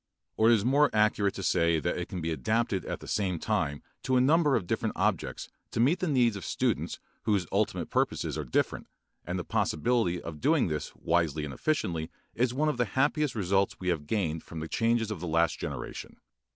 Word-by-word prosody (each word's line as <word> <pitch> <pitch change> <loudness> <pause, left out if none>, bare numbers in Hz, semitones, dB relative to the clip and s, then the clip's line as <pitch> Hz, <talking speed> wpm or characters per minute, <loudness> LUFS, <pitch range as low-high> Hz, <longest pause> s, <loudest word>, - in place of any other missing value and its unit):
Or 110 +1 +4
it 120 - +7
is 105 -1 -1
more 145 +3 +4
accurate 105 -2 +2
to 95 - -5
say 85 -3 +2
that - - -1
it - - -3
can 90 - -4
be 80 +1 -2
adapted 110 +2 0
at - - -4
the - - -10
same 95 -4 0
time 70 -2 -1 0.2
to 130 - 0
a - - +5
number 145 +2 +4
of 100 - 0
different - - -2
objects - - -1 0.2
to - - -4
meet 145 +10 +3
the 185 - -1
needs 125 -7 +3
of 100 - -6
students - - -1 0.3
whose 100 -4 +2
ultimate - - 0
purposes - - 0
are 75 - -3
different, 60 - -1 0.4
and 90 +1 -2
the 90 - -3
possibility 115 -3 +1
of 80 -3 -8
doing 150 - +3
this 75 -1 -3
wisely 80 -3 0
and 70 - -6
efficiently 85 - -1 0.2
is 120 +1 +1
one 145 +5 0
of 150 - 0
the 120 - +2
happiest 145 0 +2
results 100 -1 +1
we 90 - -2
have 75 -4 -1
gained 80 -6 -1
from 80 - -8
the 80 - -4
changes 115 +2 +1
of 105 - -4
the 90 - -5
last 85 +1 +1
generation. - - -6
100 Hz, 210 wpm, -29 LUFS, 85-125 Hz, 0.4 s, it